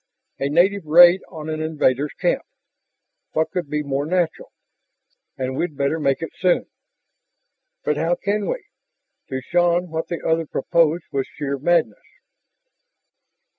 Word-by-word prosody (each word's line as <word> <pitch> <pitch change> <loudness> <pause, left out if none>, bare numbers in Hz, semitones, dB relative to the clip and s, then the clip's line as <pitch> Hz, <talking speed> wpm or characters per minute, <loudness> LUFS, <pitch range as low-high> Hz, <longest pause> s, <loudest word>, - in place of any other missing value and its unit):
"A 140 - 0
native 180 +3 +2
raid 175 +4 +8
on 155 -3 -8
an 155 0 -3
invaders' 150 -3 0
camp. - - +1 0.9
What 160 0 0
could 180 -6 -3
be 150 0 -1
more 140 +1 -2
natural? 175 -1 -1 0.9
And 130 0 -3
we'd 155 -1 -3
better 140 +3 0
make 140 +1 0
it - - -6
soon." 180 -2 +2 1.2
"But 150 - 0
how 165 +3 +1
can 205 +2 -2
we?" - - -3 0.6
To 130 0 -3
Shann 175 +2 +1
what 160 0 -3
the 170 - -4
other 160 -1 +1
proposed 165 +3 +1
was 135 -1 -1
sheer 140 -1 -4
madness. 175 - +1
160 Hz, 135 wpm, -22 LUFS, 145-175 Hz, 1.2 s, raid